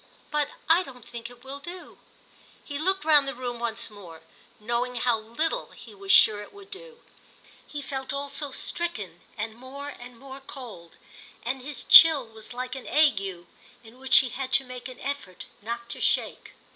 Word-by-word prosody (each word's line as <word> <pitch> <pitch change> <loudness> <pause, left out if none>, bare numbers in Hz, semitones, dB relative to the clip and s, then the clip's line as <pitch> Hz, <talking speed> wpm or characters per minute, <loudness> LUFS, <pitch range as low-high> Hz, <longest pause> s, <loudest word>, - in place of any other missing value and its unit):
But 295 -1 +1 0.2
I 330 +3 +6
don't 250 -9 -11
think 235 -1 -7
it 245 0 -16
will 270 +1 -7
do." 350 +5 -10 0.7
He 285 -1 -5
looked 380 +1 +1
round 295 -3 +6
the 275 - -3
room 245 -1 -5
once 230 -1 -2
more, 175 -6 -12 0.4
knowing 240 +3 -1
how 240 -1 +2
little 305 - -2
he - - -13
was 395 -1 -3
sure 210 - +7
it 205 - -11
would 405 -1 -15
do. 475 +4 -10 0.7
He 290 -1 -6
felt 265 -1 -4
also 280 +1 -3
stricken 215 - -3 0.2
and 220 +1 -3
more 265 +4 -8
and 245 -3 -11
more 270 +2 -10
cold, 240 - -10 0.5
and 255 +2 -2
his 290 +3 -7
chill 315 -6 +9
was 220 0 -10
like 250 +1 -5
an 265 - -7
ague 295 -10 +4 0.6
in 230 +3 -15
which 265 0 +5
he - - -3
had 260 +2 -5
to 270 - +4
make 250 -1 -8
an 255 - -11
effort 265 -10 -5 0.2
not 235 +2 -5
to - - -3
shake. - - 0
255 Hz, 180 wpm, -27 LUFS, 235-290 Hz, 0.7 s, chill